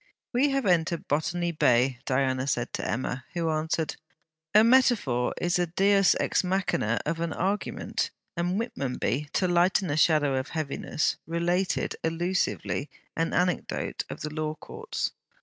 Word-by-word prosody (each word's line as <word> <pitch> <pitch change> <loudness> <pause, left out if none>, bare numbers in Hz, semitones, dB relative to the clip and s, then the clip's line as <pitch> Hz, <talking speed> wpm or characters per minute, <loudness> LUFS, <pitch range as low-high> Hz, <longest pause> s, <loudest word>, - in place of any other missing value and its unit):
'We 265 +4 +3
have 275 -3 0
entered 170 -2 +1
Botany 170 +4 0
Bay,' 125 -4 +3
Diana 130 0 +1
said 120 -3 -1
to - - -3
Emma; 125 +1 -2
who 165 -2 0
answered: 155 +1 -1 0.6
'A 215 - +8
metaphor 230 - +3
is 175 0 +1
the 175 -1 +1
Deus 195 +2 +4
ex - - +1
machine, 185 +1 0
of 135 +9 -1
an 170 -1 -1
argument'; 195 +4 -2 0.3
and 175 +2 0
Whitmonby, 140 - -2
to 185 - +2
lighten 175 0 +2
a 150 - 0
shadow 150 -3 +4
of 130 - -5
heaviness, 155 0 -1
related 175 +3 0
allusively 165 -3 -1 0.3
an 165 0 0
anecdote 180 0 -1
of - - -7
the 150 0 -4
Law 155 0 -2
Courts. - - -4
165 Hz, 145 wpm, -27 LUFS, 145-185 Hz, 0.6 s, A